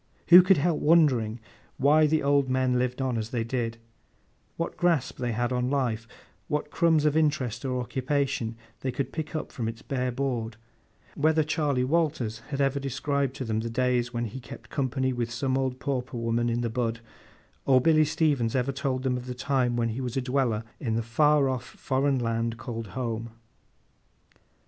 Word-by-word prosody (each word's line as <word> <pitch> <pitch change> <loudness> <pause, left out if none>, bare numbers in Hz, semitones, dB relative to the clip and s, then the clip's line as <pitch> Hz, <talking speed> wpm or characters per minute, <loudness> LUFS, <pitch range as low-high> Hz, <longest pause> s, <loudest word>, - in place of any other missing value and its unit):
Who 175 +1 +11
could 185 +1 +4
help 155 +2 +1
wondering 130 -9 +3 0.4
why 150 +3 +5
the 155 0 +1
old 140 -1 +3
men 130 -1 +2
lived 125 +1 -1
on 125 -3 0
as 110 0 -4
they 115 -2 -1
did; 115 -1 -2 0.8
what 165 - -3
grasp 170 -7 +1
they 120 -1 -1
had 120 +3 -1
on 125 0 0
life; 120 -5 -1 0.4
what 150 0 -2
crumbs 160 -3 +3
of 150 -1 +2
interest 145 -7 0
or 130 -2 -1
occupation 130 -2 -1 0.2
they 130 - -2
could 135 0 -3
pick 160 0 -4
up 155 - -4
from 115 -3 -3
its 115 +3 -6
bare 130 -3 -1
board; 120 -4 -2 0.6
whether 155 +2 +2
Charley 145 -4 0
Walters 135 -7 0
had 140 -1 -3
ever 140 0 +1
described 140 0 -1
to 135 - -4
them 110 -1 -1
the 115 +1 -3
days 125 0 +1
when 120 -1 -2
he 115 +4 -6
kept 120 -2 -12
company 130 -1 0
with 120 -1 -2
some 130 +2 -1
old 130 -1 -1
pauper 130 -2 -3
woman 115 +1 0
in 120 +1 0
the 120 - -1
bud, 115 -1 -1 0.7
or 130 -2 +6
Billy 155 +3 +4
Stevens 145 -7 +1
ever 130 +1 +1
told 130 -1 -2
them 130 -2 0
of 125 0 -7
the 125 - -4
time 125 -1 0
when 115 -1 0
he 115 +4 -4
was 125 0 -3
a - - +1
dweller 125 -4 0 0.2
in 115 -7 -1
the 115 - 0
far 145 +5 +3
off 130 -2 -2
foreign 135 +1 -1
land 115 -1 -1
called 115 -2 -6
Home! 115 -2 -3
130 Hz, 185 wpm, -27 LUFS, 120-140 Hz, 0.8 s, Who